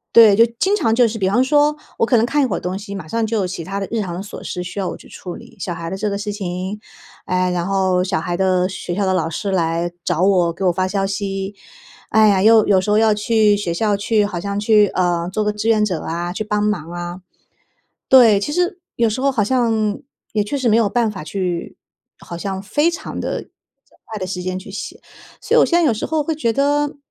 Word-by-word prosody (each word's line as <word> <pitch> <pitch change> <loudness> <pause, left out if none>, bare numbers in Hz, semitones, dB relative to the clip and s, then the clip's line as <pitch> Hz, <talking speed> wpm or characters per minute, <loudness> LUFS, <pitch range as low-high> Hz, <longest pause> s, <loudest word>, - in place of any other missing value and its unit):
对， 220 -3 +8
就 230 - +6
经 395 +2 +2
常 225 - +1
就 240 0 +4
是 225 0 -4
比 190 -2 +1
方 240 +6 +3
说， 295 +2 +3 0.2
我 - - +2
可 240 - +3
能 225 - +3
看 285 +3 +1
一 - - +3
会 225 - -1
儿 - - -4
东 180 +1 -4
西， 200 0 -8
马 185 -5 -7
上 230 +6 -1
就 220 0 -1
有 190 -3 0
其 175 -2 -5
它 195 +3 -4
的 195 - -4
日 225 -1 -1
常 180 -4 -4
的 175 - -5
琐 200 - -9
事 180 - -4
需 180 +3 -8
要 195 -2 -1
我 - - -6
去 - - -16
处 180 -2 -8
理。 - - -13
小 175 - -4
孩 165 0 -6
的 190 - -4
这 210 +2 -2
个 200 - -2
事 205 0 -4
情， 190 0 -4 0.5
哎， 185 0 0
然 175 -1 -1
后 190 -1 +1
小 190 -1 -1
孩 175 +2 -3
的 185 -1 +2
学 190 -2 -5
校 200 +1 0
的 190 - +1
老 165 -3 0
师 195 +5 -3
来 170 -1 0
找 175 -1 -1
我， 185 -3 +3
给 180 +3 -4
我 180 - +4
发 185 +2 -1
消 195 +1 -1
息， 195 0 -3 0.5
哎 220 0 +5
呀， 195 -2 +3
又 220 -1 +6
有 190 -2 +4
时 210 - -2
候 210 - +4
要 220 -1 +4
去 210 0 +3
学 180 -5 -2
校 210 +3 +1
去， 210 +1 +1
好 205 -4 -4
像 200 +3 -3
去， 210 -1 +4
呃， 175 -2 0
做 215 +2 -1
个 210 - 0
志 210 +2 -2
愿 215 -2 +3
者 180 -6 -2
啊 175 +2 -4
去 215 - -3
帮 210 -1 -1
忙 175 -6 -1
啊。 175 +1 -6 0.9
对， 230 -6 +7
其 295 - -3
实， 355 +2 0 0.2
有 235 -1 +2
时 220 +4 -3
候 275 +1 +2
好 225 -6 +1
像， 225 -3 0 0.3
也 210 -2 +1
确 280 +8 -3
实 255 -3 0
没 215 - +4
有 225 -3 +3
办 235 +2 +1
法 185 - -7
去， 180 0 -4 0.4
好 170 - -8
像 190 +1 -4
非 295 +11 +1
常 340 - -6
地 - - -4 0.6
快 215 -1 -6
的 185 - -4
时 180 -1 -4
间 185 0 -3
去 190 +1 -11
写。 - - -7 0.4
所 - - +1
以 - - +7
我 - - +6
现 345 - +2
在 340 - +3
有 235 - +2
时 215 - -4
候 315 -1 0
会 320 +2 -2
觉 265 -7 0
得， 290 +1 +1
200 Hz, 275 characters per minute, -19 LUFS, 185-225 Hz, 0.9 s, 对